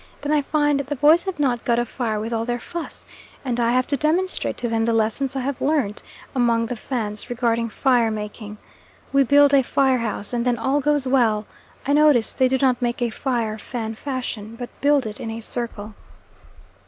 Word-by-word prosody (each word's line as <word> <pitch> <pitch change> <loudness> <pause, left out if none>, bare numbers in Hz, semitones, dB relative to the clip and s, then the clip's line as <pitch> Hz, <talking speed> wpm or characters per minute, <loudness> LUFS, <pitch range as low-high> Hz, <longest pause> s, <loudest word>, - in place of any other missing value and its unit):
Then 290 +1 -2
I 300 -1 +3
find 295 0 +1
the 280 +1 -3
boys 305 +6 +4
have 380 -2 -3
not 250 -5 +1
got 235 -3 +1
a 240 - +1
fire 225 -3 -3
with 225 +2 -4
all 225 0 0
their 240 +1 -2
fuss, 340 +5 -6 0.4
and 245 -2 -1
I 235 0 +2
have 255 0 +2
to 285 - -1
demonstrate 340 +6 0
to 245 - -2
them 225 -1 0
the 230 0 +1
lessons 225 +5 0
I 265 - -1
have 270 0 -3
learnt 270 -8 0 0.3
among 235 -2 +2
the 245 - -4
Fans 215 -3 -4
regarding 235 -1 0
fire 240 0 +2
making. 210 0 -6 0.6
We 275 - +5
build 285 +2 +5
a 275 - +6
fire 265 0 +2
house 215 -1 -3
and 235 -1 0
then 245 -1 +1
all 265 +5 +1
goes 290 -1 +1
well. 225 -5 +2 0.4
I 285 - +1
notice 295 -6 +4
they 260 - +3
do 265 +1 +1
not 255 -1 +2
make 240 -1 -1
a 240 -2 0
fire 230 -3 -2
Fan 225 -1 -5
fashion, 230 -4 -5
but 245 +1 -7
build 285 -2 +3
it 210 -1 -6
in 225 - -5
a 225 +1 -5
circle. 225 -2 -5
245 Hz, 205 wpm, -22 LUFS, 225-275 Hz, 0.6 s, a